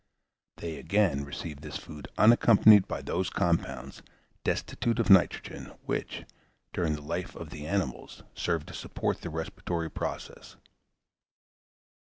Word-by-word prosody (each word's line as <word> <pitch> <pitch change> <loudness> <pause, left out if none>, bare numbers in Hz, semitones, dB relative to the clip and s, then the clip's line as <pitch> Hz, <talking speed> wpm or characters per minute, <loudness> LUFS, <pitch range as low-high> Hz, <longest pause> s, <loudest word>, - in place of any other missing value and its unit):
They, 80 -2 -5
again, 95 -9 +1
receive 70 +1 -7
this 75 -1 -5
food 75 -1 -10
unaccompanied 110 -3 +7
by - - -4
those 90 0 -1
compounds, 70 -8 -1 0.4
destitute 115 -1 -1
of 115 -3 +3
nitrogen, 95 -2 +3
which, - - -3 0.5
during 85 -4 0
the 75 - -9
life 85 +4 -4
of 80 -2 -8
the 75 0 -7
animals, 95 -8 -3
served 85 -4 -1
to - - -9
support 80 - -3
the 85 - -5
respiratory 80 +1 -3
process. - - -6
85 Hz, 125 wpm, -29 LUFS, 75-95 Hz, 0.5 s, unaccompanied